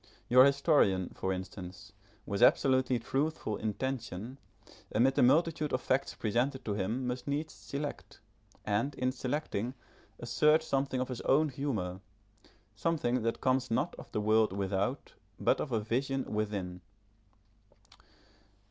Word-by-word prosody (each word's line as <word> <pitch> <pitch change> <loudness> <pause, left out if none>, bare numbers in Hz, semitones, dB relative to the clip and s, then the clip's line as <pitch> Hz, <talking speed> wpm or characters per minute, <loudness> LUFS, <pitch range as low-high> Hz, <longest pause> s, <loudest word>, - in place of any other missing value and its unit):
Your 130 +2 +8
historian, 140 - +3
for 95 - -2
instance, 95 +2 -7 0.3
with 100 -1 -3
absolutely 130 -2 +4
truthful 135 -2 -2
intention, 115 +1 -4 0.5
amid 125 +5 +3
the - - +2
multitude 155 +3 +3
of 130 - +2
facts 130 +2 0
presented 125 +5 -1
to 105 - -1
him 105 +6 -2
must 125 +1 -4
needs 145 +3 -2
select, 145 +1 -6 0.5
and 115 +7 0
in 130 -1 0
selecting 130 -2 -3 0.4
assert 150 +7 +3
something 135 -3 -1
of 130 - -3
his 125 - -4
own 150 +3 +3
humour, 110 -10 -3 0.7
something 125 -1 0
that 115 +1 -2
comes 130 0 +1
not 150 +9 0
of - - -11
the 105 - -1
world 110 -1 +3
without 100 +6 -2 0.3
but - - +2
of 140 - -4
a 115 - +1
vision 130 +5 -1
within. 100 -4 -3
125 Hz, 130 wpm, -31 LUFS, 105-135 Hz, 0.7 s, Your